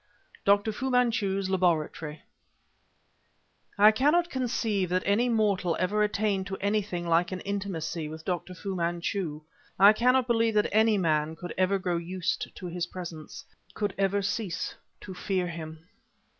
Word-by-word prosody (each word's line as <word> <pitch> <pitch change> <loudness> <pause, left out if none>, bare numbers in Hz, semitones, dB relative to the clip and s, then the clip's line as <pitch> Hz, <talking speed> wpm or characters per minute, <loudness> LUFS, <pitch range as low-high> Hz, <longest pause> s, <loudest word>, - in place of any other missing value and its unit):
DR. 205 +2 +3
FU 265 +5 -3
MANCHU'S 225 -6 +1
LABORATORY 165 -4 -1 1.5
I 210 +2 +8
cannot 305 +9 +2
conceive 225 -7 -1
that 185 +1 0
any 205 +5 +3
ordinary 235 -2 +1
mortal 195 -6 +1
ever 200 +4 +1
attained 205 -2 0
to 190 - -4
anything 200 -3 -1
like 170 +2 +2
an 185 - -3
intimacy 175 -6 -3
with 160 +1 -9
Dr. 180 0 -3
Fu 195 0 -5
Manchu; 170 -2 -2 0.4
I 200 +3 +8
cannot 250 +3 +3
believe 230 -2 +1
that 210 - +3
any 220 0 +4
man 160 -3 +1
could 175 +1 -7
ever 185 +1 +2
grow 180 -2 -1
used 185 +2 -3
to 185 - -9
his 175 0 -3
presence, 170 -4 -8 0.3
could 205 -2 -1
ever 200 +1 +1
cease 195 -2 -2 0.3
to 190 - -8
fear 185 0 -1
him. 160 -2 -7
190 Hz, 150 wpm, -28 LUFS, 175-210 Hz, 1.5 s, I